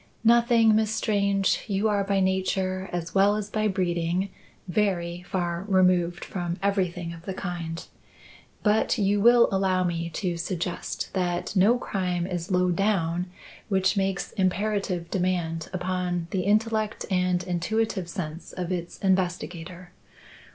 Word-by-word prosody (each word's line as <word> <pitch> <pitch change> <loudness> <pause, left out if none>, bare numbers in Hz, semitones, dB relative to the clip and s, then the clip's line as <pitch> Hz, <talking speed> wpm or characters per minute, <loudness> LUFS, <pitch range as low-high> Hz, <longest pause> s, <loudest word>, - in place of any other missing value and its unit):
"Nothing, 230 -1 +5
Miss 220 -1 +2
Strange. 200 -2 +1
You 200 +1 +1
are 205 -2 +1
by 195 0 +1
nature, 190 0 0
as 175 -1 -4
well 200 +1 +4
as 210 -1 -4
by 215 0 +1
breeding, 180 -1 0 0.4
very 175 -3 0
far 175 -1 -1
removed 180 -2 +2
from 175 -2 -3
everything 180 -4 0
of 165 0 -12
the 190 - -4
kind. 170 -3 -5 0.8
But 215 +3 +2
you 205 -1 +2
will 235 +2 +7
allow 190 -1 +2
me 170 -1 -2
to 175 0 -2
suggest 175 +1 -4
that 180 +1 -1
no 205 +6 +5
crime 180 -6 -2
is 175 -2 -4
low 180 -1 +2
down 180 -2 0 0.4
which 190 0 +2
makes 195 -1 -1
imperative 190 -2 -1
demand 175 -3 -1
upon 180 -1 -2
the 185 -2 -1
intellect 215 +1 +1
and 180 -1 +1
intuitive 185 +1 -1
sense 165 -3 -6
of 180 -1 -4
its 175 -1 -4
investigator. 180 -1 -1
185 Hz, 135 wpm, -26 LUFS, 175-200 Hz, 0.8 s, will